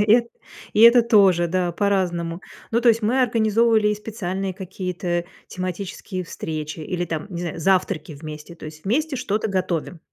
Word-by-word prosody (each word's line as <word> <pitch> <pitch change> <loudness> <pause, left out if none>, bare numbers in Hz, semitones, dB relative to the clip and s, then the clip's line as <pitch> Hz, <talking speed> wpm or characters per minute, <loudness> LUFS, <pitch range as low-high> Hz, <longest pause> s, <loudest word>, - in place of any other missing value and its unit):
И 210 - +6
э 235 -1 -1 0.5
и 210 - +3
это 235 +1 +8
тоже, 195 -7 +4
да, 180 0 0
по-разному. 175 -3 0 0.3
Ну, 235 - +2
то 240 - +4
есть 230 0 +4
мы 240 +5 +2
организовывали 225 -2 +3
и 210 - +1
специальные 195 -3 -4
какие-то 180 -2 -3 0.2
тематические 185 +1 -5
встречи, 155 -1 -5
или, 175 +3 -3
там, 160 0 -4
не 175 -3 -5
знаю, 170 -2 -4
завтраки 180 -2 +1
вместе, 150 +2 -9
то 170 - -13
есть 155 +2 -10
вместе 290 +8 0
что-то 220 -4 -1
готовим. 180 -3 -2
185 Hz, 165 wpm, -22 LUFS, 170-215 Hz, 0.5 s, это